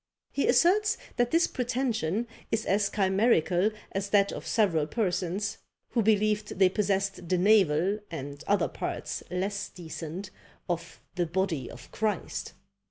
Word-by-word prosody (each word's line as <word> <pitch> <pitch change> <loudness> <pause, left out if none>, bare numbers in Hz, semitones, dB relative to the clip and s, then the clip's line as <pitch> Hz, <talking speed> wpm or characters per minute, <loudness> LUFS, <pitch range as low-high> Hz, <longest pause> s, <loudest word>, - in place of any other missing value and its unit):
He 280 - 0
asserts 400 - +4 0.2
that 245 0 +2
this 330 +4 +4
pretension 240 -5 -1 0.3
is 225 - 0
as 200 +1 +2
chimerical 195 -2 +3 0.2
as 195 +1 -2
that 200 -1 +4
of - - -7
several 170 -9 +2
persons, 200 +1 -1 0.3
who 235 - +1
believed 210 -1 +1
they 190 -1 +6
possessed 195 -2 -1
the 185 - +3
navel, 190 -1 +4
and 145 -2 -6
other 205 - +3
parts - - -4
less 195 +3 -2
decent, 175 +2 -7 0.4
of 170 -1 -4
the 175 -1 0
body 170 -6 -1
of 120 +1 -12
Christ! 210 -4 -2
195 Hz, 135 wpm, -28 LUFS, 175-215 Hz, 0.4 s, they